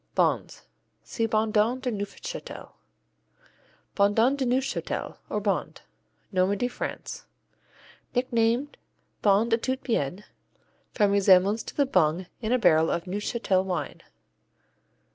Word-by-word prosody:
Bondes - - 0 0.4
see 225 -1 -2
Bondon 220 +2 +1
de 255 -1 -2
Neufchâtel. 225 - -6 1.2
Bondon 220 +6 +3
de 275 -2 -1
Neufchâtel, 260 +2 -2
or - - -1
Bondes - - -2 0.5
Normandy, 195 +5 +1
France 245 - -6 0.9
Nicknamed 245 +2 +1 0.4
Bonde 210 +3 +3
à 230 - +2
tout 260 0 -1
bien, 190 - -1 0.7
from 205 -3 +2
resemblance 200 +1 +4
to - - -9
the 285 - +3
bung 180 - +2 0.2
in 220 0 -2
a 250 - +4
barrel 160 -8 +4
of 170 - -1
Neuchâtel 195 0 0
wine. 185 -2 -4
215 Hz, 110 wpm, -26 LUFS, 195-245 Hz, 1.2 s, resemblance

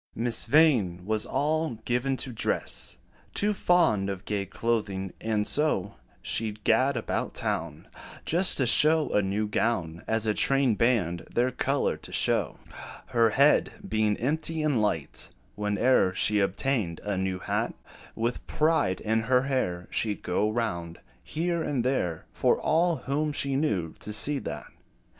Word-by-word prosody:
Miss 120 0 +1
Vain 115 - +3
was 110 +1 -1
all 155 0 -1
given 125 +2 0
to 130 - -3
dress 110 - -1 0.4
Too 210 +1 +2
fond 165 - +2
of 95 -2 -6
gay 100 -2 -2
clothing; 100 -3 -2
and 110 -2 -1
so, 125 -11 +1 0.3
She 110 -1 0
'd 105 0 -15
gad 130 +4 +2
about 115 - -3
town 80 -2 -3 0.4
Just 180 +3 +4
to 130 - +1
show 155 +5 +6
a 105 - +3
new 100 +2 -1
gown, 95 -6 -2
As 110 0 0
a 105 - +1
train 135 +1 +3
band 100 -7 0
their 125 +2 +1
color - - -1
to - - -12
show. - - +1 0.5
Her 115 -1 +3
head 140 +7 +3
being 110 - 0
empty 155 +4 -2
and 145 -7 +1
light, 80 -8 -2 0.3
Whene'er 105 -1 +1
she 105 +1 +3
obtained 100 -2 -1
a 105 -1 -2
new 95 0 -2
hat, - - -2 0.4
With 120 +2 -3
pride 155 - +1
in 110 +1 0
her 125 +3 +1
air, 90 -11 -2
She 105 -2 0
'd - - -22
go 105 +4 0
round, 85 -7 -3 0.2
here 170 +1 -2
and 135 -6 -2
there, 90 -11 -1
For - - +1
all 170 +2 +2
whom 150 +2 -2
she 140 -1 -2
knew 100 - -1
to 105 - -6
see 140 +7 +2
that. - - -6
115 Hz, 155 wpm, -27 LUFS, 100-140 Hz, 0.5 s, show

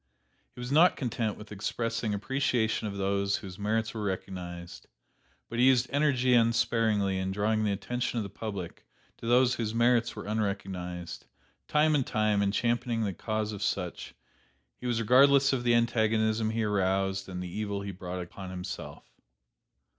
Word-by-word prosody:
He - - -12
was 125 +1 -5
not 165 +5 +6
content 115 -4 -2
with 105 0 -12
expressing 115 +2 -2
appreciation 115 -1 0
of 100 -1 -5
those 100 0 +1
whose 95 -1 -7
merits 110 +2 0
were 110 - -4
recognized, 90 -3 -5 0.6
but 120 - -4
he 125 - +6
used 125 -2 +5
energy 135 -3 +2
unsparingly 115 -4 +2
in 95 0 -2
drawing 110 +2 +1
the 105 - +1
attention 120 +5 -2
of 115 - 0
the 100 - -6
public 100 -5 -6 0.3
to 115 - -7
those 125 +1 +4
whose 115 -2 -3
merits 120 0 +3
were - - -7
unrecognized; 95 -4 -4 0.4
time 155 0 +3
after 135 -3 0
time 110 -2 +2
in 100 -1 +2
championing 115 +1 0
the 100 - -2
cause 110 +3 -2
of 105 -2 -7
such, 90 -3 -3 0.6
he 125 - -7
was 120 -2 0
regardless 135 +4 +5
of 125 -2 -1
the 120 -1 +4
antagonism 110 -1 +2
he 110 0 -1
aroused 95 -1 0
and 90 -1 -5
the 90 -1 -7
evil 100 -2 -2
he 100 0 -5
brought 90 -1 -5
upon 95 +2 -9
himself. 90 0 -7
110 Hz, 165 wpm, -29 LUFS, 100-120 Hz, 0.6 s, not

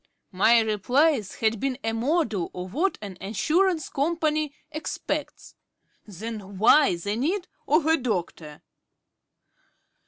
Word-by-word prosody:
_" - - -49 0.3
My 220 +5 +5
replies 225 - +1
had 220 -1 0
been 265 0 -1
a 225 - -1
model 230 - 0
of 180 +1 -6
what 360 +8 0
an 190 -3 -8
Assurance 310 - +1
Company 310 0 0 0.2
expects. 310 +1 -5 0.5
Then 205 0 -7
why 225 +2 +5
the 200 +5 -3
need 345 - -1 0.2
of 305 +1 +3
a 320 +1 +4
doctor? 175 - -4
230 Hz, 120 wpm, -25 LUFS, 200-310 Hz, 0.5 s, My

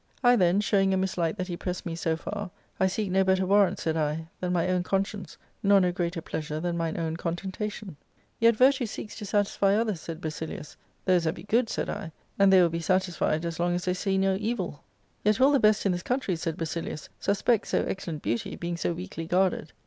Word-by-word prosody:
I 245 0 +6
then, 185 -1 +3
showing 195 -2 +2
a - - +1
mislike 185 -2 -1
that 185 -2 -3
he 175 - -3
pressed 180 +1 -4
me 165 -2 -3
so 165 -1 -1
far, 205 +3 -5 0.2
* - - -37
I 190 - +4
seek 195 +1 -2
no 190 +1 +4
better 190 0 +2
warrant,' 200 0 +4
safd 160 0 -1
I, 155 +1 -1
* - - -40
than 180 -1 -2
my 175 -1 +1
own 185 -1 +1
con 195 +2 +1
science, 195 -6 -9 0.2
nor 200 0 +5
Jio 180 -2 +2
greater 170 -2 -2
pleasure 155 0 -4
than 175 +1 -2
mine 165 -1 -2
own 165 0 -2
contentation/ 190 +1 -4 0.4
*Yet 230 0 +5
virtue 260 +1 +4
seeks 210 - -7
to 210 -2 -6
satisfy 200 -1 +2
others,' 215 -6 0
said 165 -1 -6
Basilius, 155 -1 -6 0.2
* - - -40
Those 180 -3 +3
that 160 - 0
be 170 - -10
good,' 230 +3 +1
said - - -2
I; 200 -6 -5
* - - -31
and 195 -1 +6
they 190 - +7
will 170 - +3
be 165 +1 -3
satisfied 175 -2 0
as 170 -1 -4
long 175 0 +1
as 175 - -3
they 180 - +1
see 190 +1 0
no 190 0 +2
evil.' 205 -9 -3 0.2
* - - -40
Yet 210 0 +3
will 270 +2 +6
the 280 - +4
best 215 -2 +3
in 195 - +3
this 175 0 -2
country,' 250 -4 -1
said 165 -1 -3
BasiUus, 165 -1 -4
^suspect 205 +3 +1
so - - +1
excellent 165 -5 -4
beauty, 115 - -2
being 170 0 -4
so 170 - -1
weakly 165 -2 -6
^guarded.' 180 -3 +1
185 Hz, 240 wpm, -27 LUFS, 170-200 Hz, 0.4 s, they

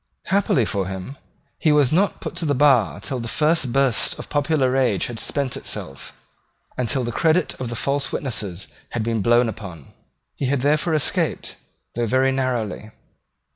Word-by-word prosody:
Happily 190 - +2
for 100 -2 -1
him, 95 +8 -6 0.4
he 155 - +3
was 145 -4 +4
not 190 +5 +1
put - - -5
to 165 - -1
the 145 - +1
bar 125 - +3
till 130 - -3
the 115 - -5
first 150 -1 +2
burst 135 -2 +2
of - - -8
popular 145 -2 +1
rage 125 -8 +1
had 120 -2 -6
spent 140 -3 -2
itself, 70 0 -6 0.6
and 125 -2 -2
till 130 - +2
the 120 - -2
credit 160 +7 +2
of 125 - -3
the 120 - -4
false 140 +4 -1
witnesses 105 - -4 0.2
had 115 - -1
been 115 -1 -1
blown 120 +4 +4
upon. 90 -10 -8 0.4
He 135 - -2
had 135 -1 0
therefore 155 +4 +2
escaped, 150 - 0 0.4
though 120 0 -1
very 130 +3 +2
narrowly. 120 -6 -2
130 Hz, 175 wpm, -22 LUFS, 110-145 Hz, 0.6 s, was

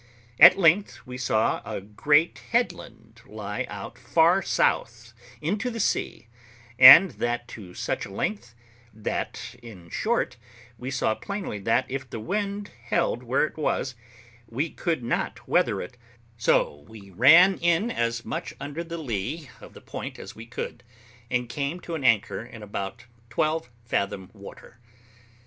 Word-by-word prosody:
At 175 +4 +10
length 190 +2 +2
we 125 - -8
saw 110 -3 +1
a 110 -1 -5
great 145 - +1
headland 240 +1 -3
lie - - -5
out - - -8
far 170 +4 +3
south 120 -8 0 0.3
into 205 +10 -1
the 230 -1 -6
sea, 190 - -1 0.5
and 145 +8 +11
that 120 -1 -3
to 90 -5 -10
such - - -3
a - - -13
length, 115 +3 -4 0.4
that, 110 0 -4
in 95 -8 -13
short, 215 - -1 0.4
we 125 - -5
saw 125 -4 0
plainly 200 - -5
that, 115 +3 +1
if 130 -1 -5
the 115 - -6
wind 200 - -3
held 120 0 0
where 125 +4 +1
it 155 - -9
was, 140 -3 -1 0.5
we 140 +8 -2
could 165 -8 -2
not 120 - -3
weather - - +2
it, 125 - -11 0.4
so 75 -9 +1
we 100 -3 -13
ran 165 - +7
in 175 +7 +2
as 115 - -2
much 155 -1 -5
under 145 +4 -5
the 170 0 -6
lee 135 - -4
of - - -13
the - - -12
point - - -7
as - - -10
we 115 +1 -10
could, 120 0 -6 0.5
and 125 -1 -1
came 140 +7 -3
to 170 - -7
an 155 -4 -4
anchor 115 -2 +2
in 110 -2 -11
about 105 +3 -6 0.2
twelve 155 +3 -1 0.2
fathom 100 -4 -2
water. 100 +2 -13
125 Hz, 150 wpm, -25 LUFS, 110-165 Hz, 0.5 s, and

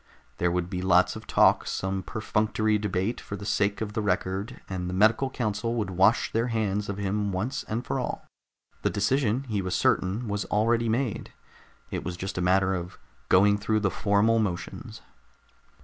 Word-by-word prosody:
There 90 - +2
would 90 0 -1
be 90 0 -4
lots 95 - +3
of - - -9
talk, - - +4
some 95 0 -2
perfunctory 110 +2 0
debate 105 +2 -1
for 100 - -6
the 100 0 -8
sake 100 0 0
of 105 -1 -3
the 110 - -1
record, 100 +3 -2
and 90 -2 -4
the 90 - -3
medical 110 +7 +3
council 115 -1 -2
would 105 -5 -2
wash 95 +6 +3
their 115 +2 0
hands 105 -3 -1
of 100 - -3
him 100 0 -1
once 100 +8 -2
and 115 +3 -3
for 135 - -1
all. 125 - -4 0.6
The - - +1
decision, 125 +3 +1
he 110 -7 -2
was 95 -1 -2
certain, 100 +6 +1
was 105 0 -2
already 115 +2 +1
made. 120 -1 -2 0.6
It - - -3
was 90 - -5
just 95 0 -4
a - - -1
matter 95 +1 +3
of 90 -1 -5 0.3
going 100 +2 +5
through 110 +1 0
the 100 -2 +1
formal 105 +4 +2
motions. 95 -6 -4
105 Hz, 180 wpm, -27 LUFS, 95-110 Hz, 0.6 s, going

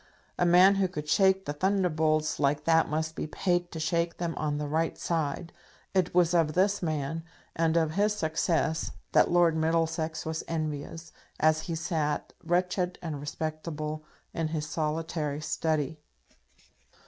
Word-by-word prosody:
A 175 - +3
man 180 +3 +7
who 195 -1 +2
could 150 -4 -6
shake 190 +3 +3
the 145 - -2
thunderbolts 155 -3 +1
like 145 +1 +1
that 165 0 +3
must 160 +1 -2
be - - -3
paid 175 +1 0
to 160 - -6
shake 170 +1 0
them 170 -1 -2
on 150 -1 -1
the 150 - -2
right 160 +2 0
side. 165 0 -2 0.4
It 185 -3 +2
was 175 -1 +4
of 165 -3 +3
this 195 +4 +2
man, 160 -1 -2 0.3
and 165 0 +2
of 160 -2 +2
his 205 +5 +1
success, 160 -1 0 0.2
that - - +5
Lord 175 -2 +4
Middlesex 160 0 0
was 160 0 -3
envious, 155 0 -4 0.3
as 155 0 +3
he 165 - -1
sat, 155 -2 -2
wretched 180 +1 0
and 155 -4 -4
respectable, 155 0 -4 0.3
in 165 -1 -1
his 155 -1 -3
solitary 155 -1 -2
study! 155 -1 -1
160 Hz, 150 wpm, -28 LUFS, 155-175 Hz, 0.4 s, man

